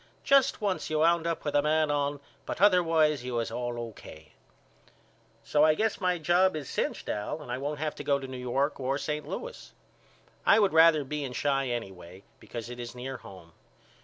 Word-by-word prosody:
Just 275 -3 +3
once 200 -3 -1
you 155 - 0
wound 170 +1 +3
up 165 -1 -3
with 145 - -1
a 145 - +4
man 155 0 +2
on 145 -1 -1 0.3
but - - -4
otherwise 165 -7 +4
you 125 -1 -4
was 115 -1 -1
all 120 -1 -3
O.K. 80 -9 -10 1.1
So 145 +6 +2
I 155 0 +5
guess 220 +3 -1
my 180 -1 +1
job 175 +3 +3
is 150 -4 -5
cinched - - -2
Al 105 +9 -3
and 145 -5 -9
I 125 - -2
won't 145 +2 -3
have 155 0 -2
to - - -8
go 140 - +2
to 135 - -7
New 130 - -7
York 135 +4 -1
or 135 +1 -1
St. 150 0 -4
Louis. 485 - -7 0.7
I - - +6
would 200 -5 +3
rather 160 -2 +6
be 150 +2 -4
in 125 -2 -5
Chi 135 -2 0
anyway 95 -6 -6 0.2
because 115 -2 -7
it 125 0 -8
is 120 0 -7
near 130 +1 -6
home. 95 -7 -13
145 Hz, 200 wpm, -28 LUFS, 125-160 Hz, 1.1 s, I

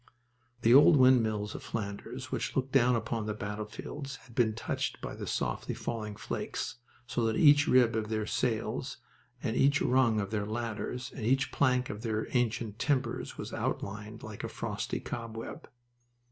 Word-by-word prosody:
The 115 - +6
old 150 +3 +8
windmills 110 -5 +4
of - - -6
Flanders 100 -3 -5
which - - -2
looked 135 0 0
down 125 -2 +5
upon 115 -1 -2
the 105 - -2
battlefields 105 +7 -5
had 125 - -16
been 110 -3 +2
touched 115 - -2
by - - -5
the - - -6
softly - - -2
falling 105 -3 -4
flakes, - - -4 0.3
so 120 0 -1
that 110 -1 +1
each 145 -1 +6
rib 125 -3 +5
of 110 -1 -1
their 110 -1 -1
sails 120 +3 -1 0.5
and 115 -2 -1
each 140 +1 +4
rung 125 -4 +3
of 100 0 -3
their 105 -2 -1
ladders 120 +2 -3
and 120 - -6
each 135 +4 +2
plank 125 -2 +2
of 105 - -7
their 110 -1 -1
ancient 115 -3 0
timbers 130 -5 -1
was - - -6
outlined 105 +2 -4
like 105 -1 -7
a - - -3
frosty - - -3
cobweb. 115 -1 -6
115 Hz, 165 wpm, -31 LUFS, 110-130 Hz, 0.5 s, old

